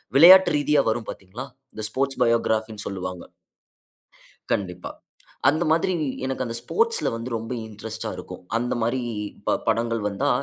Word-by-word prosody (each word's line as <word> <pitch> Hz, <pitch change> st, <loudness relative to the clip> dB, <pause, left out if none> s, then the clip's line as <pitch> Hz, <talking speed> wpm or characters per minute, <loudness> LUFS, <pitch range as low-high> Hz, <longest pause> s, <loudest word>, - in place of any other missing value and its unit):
விளையாட்டு 180 Hz, +4 st, +9 dB
ரீதியா, 145 Hz, 0 st, +3 dB
வரும் 110 Hz, 0 st, -2 dB
பார்த்தீங்களா? 100 Hz, +8 st, -7 dB, 0.3 s
இந்த 110 Hz, -, -6 dB
ஸ்போர்ட்ஸ் 135 Hz, +2 st, -1 dB
பயோகிராஃபின்னு 110 Hz, -2 st, +1 dB
சொல்வாங்க. 90 Hz, -2 st, -5 dB, 1.3 s
கண்டிப்பா. 90 Hz, -2 st, -2 dB, 0.6 s
அந்த 160 Hz, +4 st, +2 dB
மாதிரி, 165 Hz, +3 st, +2 dB, 0.3 s
எனக்கு 130 Hz, -1 st, -2 dB
அந்த 115 Hz, -, -4 dB
ஸ்போர்ட்ஸ்ல 460 Hz, -, +1 dB
வந்து 115 Hz, +2 st, -6 dB
ரொம்ப 115 Hz, +3 st, -5 dB
இன்ட்ரெஸ்ட்டா 110 Hz, +1 st, -6 dB
இருக்கும். -, -, -9 dB
அந்தமாரி 120 Hz, +1 st, 0 dB, 0.4 s
ப -, -, +2 dB, 0.2 s
படங்கள் 115 Hz, 0 st, +1 dB
வந்தா, 130 Hz, +8 st, -1 dB
115 Hz, 125 wpm, -24 LUFS, 110-140 Hz, 1.3 s, விளையாட்டு